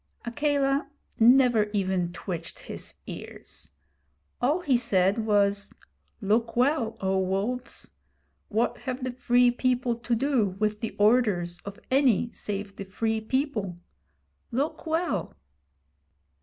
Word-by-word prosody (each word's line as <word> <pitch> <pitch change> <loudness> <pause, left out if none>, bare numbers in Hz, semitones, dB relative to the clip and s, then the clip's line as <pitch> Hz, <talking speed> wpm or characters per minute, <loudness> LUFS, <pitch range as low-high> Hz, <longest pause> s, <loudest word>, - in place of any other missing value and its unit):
Akela 275 +2 +1 0.3
never 240 -2 +6
even 190 -3 0
twitched 175 - -6
his - - -7
ears: - - -10 0.7
all 295 +9 +2
he 285 -7 +2
said 215 -2 +2
was: 200 -1 +2 0.5
'Look 225 +3 +1
well, 250 -2 +1
O 190 0 +1
Wolves! 195 +7 -2 0.6
What 225 +3 0
have 255 0 -4
the 255 - -1
Free 245 0 +3
People 250 0 +1
to 235 +1 -1
do 230 -7 +1
with 210 0 0
the 225 - -4
orders 205 -6 +2
of 200 +2 -8
any 255 -4 +3
save 200 -1 -5
the - - -5
Free 220 +3 -1
People? 220 - -1 0.7
Look 285 +6 -2
well!' 320 - -1
230 Hz, 115 wpm, -27 LUFS, 200-255 Hz, 0.7 s, never